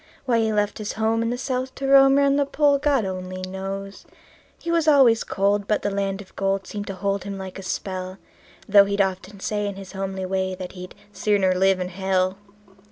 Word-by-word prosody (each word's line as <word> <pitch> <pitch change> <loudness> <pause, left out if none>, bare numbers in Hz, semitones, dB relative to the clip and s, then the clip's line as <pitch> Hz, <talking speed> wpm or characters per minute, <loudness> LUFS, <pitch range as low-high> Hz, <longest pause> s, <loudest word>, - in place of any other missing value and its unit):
Why 240 -3 +2
he 220 -1 +1
left 210 0 0
his 210 -1 -4
home 220 +1 0
in 230 - 0
the 245 - -2
South 260 0 -3
to 275 - -5
roam 270 0 +6
'round 280 0 +3
the 285 - +2
Pole, 285 -1 +3
God 280 -6 +2
only 185 0 -5
knows. 195 +1 -6 0.6
He 335 - -4
was 335 -2 +1
always 265 -7 +5
cold, 200 +1 0
but 210 - 0
the 205 - 0
land 195 0 -2
of 190 - -16
gold 195 0 -1
seemed 205 -1 -6
to 195 - -5
hold 200 +1 -1
him 200 0 -6
like 190 0 -7
a - - -6
spell; 185 0 -4 0.5
Though 200 -1 +7
he'd 200 +1 -2
often 190 +1 -1
say 205 +1 -2
in 200 - -4
his 195 -1 -10
homely 190 -1 -4
way 190 0 -1
that 180 -1 -7
he'd 180 -1 -10 0.2
"sooner 200 -3 +2
live 190 +1 +3
in 180 0 -3
hell". 185 0 0
200 Hz, 215 wpm, -23 LUFS, 190-225 Hz, 0.6 s, Though